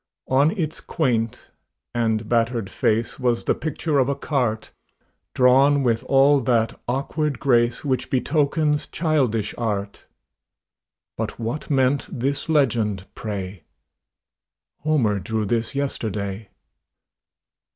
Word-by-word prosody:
On 140 +3 +4
its 160 -4 -2
quaint 115 -8 -1 0.4
and 110 -2 0
battered 115 -3 0
face 115 +6 0
Was 120 -2 +1
the - - +2
picture 155 -1 -1
of 130 0 +2
a 140 - 0
cart, 125 -6 -1 0.6
Drawn 135 +3 +5
with 115 -3 +1
all 140 +1 +5
that 115 -2 0
awkward 140 +2 -1
grace 120 0 +2
Which 130 -2 -1
betokens 150 +2 +1
childish 135 - 0
art; 100 -3 -3 1.1
But - - -3
what 115 +6 -4
meant 135 -1 +2
this 140 +5 -2
legend, 115 -10 +1
pray: 95 -4 -5 1.2
"Homer 130 -10 +1
drew 110 +3 -2
this 115 +4 -1
yesterday?" 105 -7 -3
125 Hz, 110 wpm, -23 LUFS, 110-140 Hz, 1.2 s, Drawn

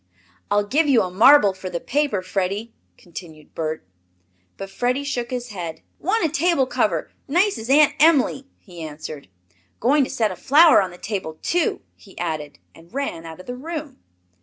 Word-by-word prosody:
"I'll 205 0 +2
give 295 +7 +1
you 240 -6 +5
a 180 - -4
marble 210 +1 +6
for 185 0 -7
the 170 - -3
paper, 275 - -1
Freddie," 195 +4 -3 0.2
continued 160 -3 -12
Bert. 155 -7 -4 0.7
But 195 0 -7
Freddie 250 +6 -1
shook 245 -4 -3
his 245 -1 -4
head. 175 -6 -6 0.2
"Want 415 +3 +1
a - - +1
table 310 -1 +2
cover, - - -1 0.2
nice 355 - +2
as 225 +2 -7
Aunt 290 +1 +5
Em'ly," 280 -3 +3
he 175 -4 -13
answered. 155 -3 -8 0.5
"Going 275 +5 +3
to - - -3
set 225 -6 0
a - - -6
flower 305 - +6
on 190 - -2
the 175 - -13
table 185 -6 -5
too!" 350 -1 0
he 195 - -18
added, 155 -4 -4 0.2
and 165 +1 -18
ran 245 -12 -4
out 160 +1 -10
of 185 - -11
the 245 - -6
room. 300 0 -7
225 Hz, 180 wpm, -22 LUFS, 180-285 Hz, 0.7 s, marble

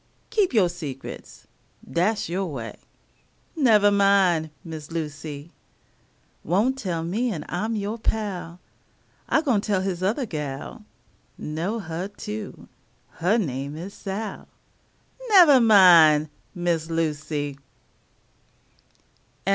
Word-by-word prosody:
Keep 415 -4 +2
yo' 200 -5 +5
secrets 150 -7 -8 0.4
dat's 210 +5 0
yo' 185 +3 -2
way 135 -10 -6 0.8
Nevah 215 -9 +4
min', 195 -5 +3
Miss 160 -2 -8
Lucy. 155 -1 -6 0.9
Won't 210 - +1
tell 170 -7 -3
me 220 +9 -1
an' 155 -6 -5
I'm 215 +6 -2
yo' 210 +2 -3
pal 195 -6 -3 0.7
I'm 320 - +3
gwine 245 -9 +2
tell 200 -3 0
his 185 -2 -3
othah 215 +8 0
gal, 150 -8 -6 0.5
Know 165 +9 -3
huh, 175 0 -5
too, 105 +1 -7 0.5
huh 185 +7 +2
name 140 - -3
is 185 +5 -7
Sal; 205 +2 -6 0.8
Nevah 340 - +7
min', 170 -8 +7 0.2
Miss 170 -2 -1
Lucy! 150 -3 -2
175 Hz, 105 wpm, -24 LUFS, 155-210 Hz, 0.9 s, Nevah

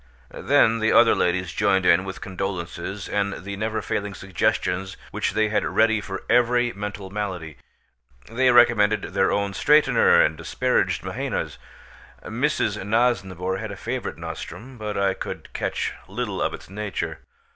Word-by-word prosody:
Then 115 0 +3
the 110 0 +2
other 115 - +6
ladies 90 -1 0
joined 95 -3 +2
in 90 +1 +5
with 95 0 -7
condolences 95 0 -5
and 100 -1 -1
the 100 +1 -5
never 110 +2 -2
failing 100 -1 -3
suggestions 95 0 -1
which - - -1
they 110 -1 +2
had 105 -1 +1
ready 110 -1 +2
for 95 -2 -6
every 120 0 +3
mental 100 -1 -6
malady. 90 -8 -4 0.7
They 130 +3 +2
recommended 115 -4 +5
their 95 0 +2
own 100 -1 0
straightener 150 +9 +5
and 80 - -1
disparaged 85 +10 0
Mahaina's. - - -3 0.6
Mrs. - - -1
Nosnibor 95 -4 0
had 110 0 -5
a 100 - -7
favourite 120 +5 -4
nostrum, 125 +1 -8
but 105 -1 -4
I 100 -1 +2
could - - -7
catch - - -2
little - - -3
of - - 0
its - - -14
nature. 105 +1 -4
100 Hz, 145 wpm, -24 LUFS, 95-110 Hz, 0.7 s, other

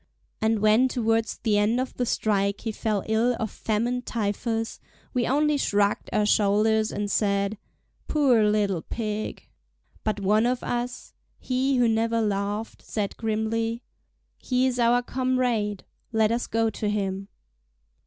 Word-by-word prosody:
And 220 -1 +1
when 215 +4 +5
towards 225 -2 0
the 215 -3 +1
end 220 +4 +2
of 255 0 -3
the 245 - -2
strike 200 -2 0
he 225 - -2
fell 210 -2 -1
ill 225 +3 +2
of 220 -2 -2
famine 235 +3 -1
typhus, 225 0 -2 0.3
we 245 -3 +1
only 295 +3 +2
shrugged 205 -6 +1
our 210 - +2
shoulders 215 +1 +3
and 205 0 -3
said: 200 0 +1 0.5
"Poor 265 -7 +3
little 200 -5 +1
Pig!" 215 +1 -4 0.6
But 215 -1 -1
one 210 +4 +3
of 250 0 -1
us—he 255 +2 -3
who 245 -1 +4
never 225 +1 +1
laughed—said 205 0 -2
grimly: 225 +1 -1 0.6
"He 255 0 +1
is 250 -1 0
our 240 +1 +3
comrade, 250 -6 0 0.3
let 220 -1 +2
us 235 +1 -1
go 225 0 +1
to 210 0 -2
him." 195 -1 -2
220 Hz, 135 wpm, -26 LUFS, 210-240 Hz, 0.6 s, when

